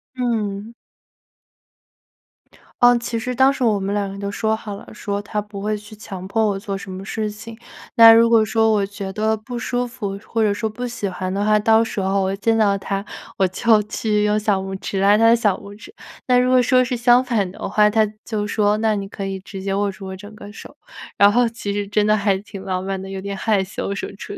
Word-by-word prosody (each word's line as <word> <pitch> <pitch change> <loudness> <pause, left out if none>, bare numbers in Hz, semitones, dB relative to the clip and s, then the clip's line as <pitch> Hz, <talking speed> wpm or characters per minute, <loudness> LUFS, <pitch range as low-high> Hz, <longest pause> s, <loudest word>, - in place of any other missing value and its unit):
嗯。 220 -3 -2 2.1
呃， 245 0 +6
其 235 -1 -3
实 250 +2 -3
当 265 +2 +4
时 265 - -3
我 215 -4 +2
们 195 +1 -2
两 205 -1 -1
个 - - -7
人 200 - -9
都 200 0 -4
说 220 +1 0
好 215 -2 -7
了， - - -12
说 200 0 -4
他 205 +1 -4
不 205 -1 -7
会 210 +1 -1
去 210 +1 -13
强 190 -3 -8
迫 220 +3 0
我 200 -2 -1
做 200 0 -5
什 195 0 -8
么 190 +1 -7
事 215 +1 -3
情。 220 +2 -10 0.4
那 230 0 +9
如 230 +1 +6
果 230 -1 +5
说 220 +1 +2
我 210 -2 +2
觉 195 -1 -6
得 220 +2 0
不 240 +3 -7
舒 245 +2 -1
服， 215 -5 -5
或 225 +1 -2
者 215 -2 +3
说 220 +2 -2
不 245 +3 -5
喜 230 -4 -4
欢 185 0 -4
的 200 +2 -1
话， 215 0 +4
到 225 +1 +4
时 225 - -4
候 195 +1 0
我 190 0 -1
一 - - -2
见 225 +2 +1
到 205 -2 +3
他， 195 +1 -4 0.3
我 195 - +3
就 220 +3 +3
去 210 0 -1
用 210 0 +2
小 210 -2 +1
拇 190 0 -5
指 195 - -3
拉 200 +1 +5
他 225 +2 +4
的 230 - +6
小 210 -5 +1
拇 200 0 -11
指。 230 - -14 0.3
那 250 -1 +4
如 250 0 +2
果 255 - +5
说 255 +1 +4
是 250 0 -2
相 240 +2 +4
反 215 -7 -1
的 - - -6
话， 210 0 +4
他 220 +1 +3 0.2
就 210 -2 -3
说 205 0 +1
那 220 0 +1
你 200 -1 -4
可 195 0 -6
以 195 0 -4
直 195 -1 -9
接 195 0 -2
握 200 0 0
住 190 0 -10
我 190 - -6
整 205 +3 -12
个 205 -1 -11
手， 215 - -12 0.4
然 200 0 +6
后 245 +2 +3
其 225 -3 -5
实 205 0 -3
真 210 +1 +1
的 215 0 +4
还 200 -1 +1
挺 200 -1 -10
浪 185 -1 -3
漫 195 0 -3
的， 190 0 -8
有 190 0 -5
点 200 0 -5
害 205 -2 +1
羞 195 +1 -4
什 200 - -4
么 - - -11
之 195 - -9
类。 - - -8
210 Hz, 270 characters per minute, -20 LUFS, 195-225 Hz, 2.1 s, 那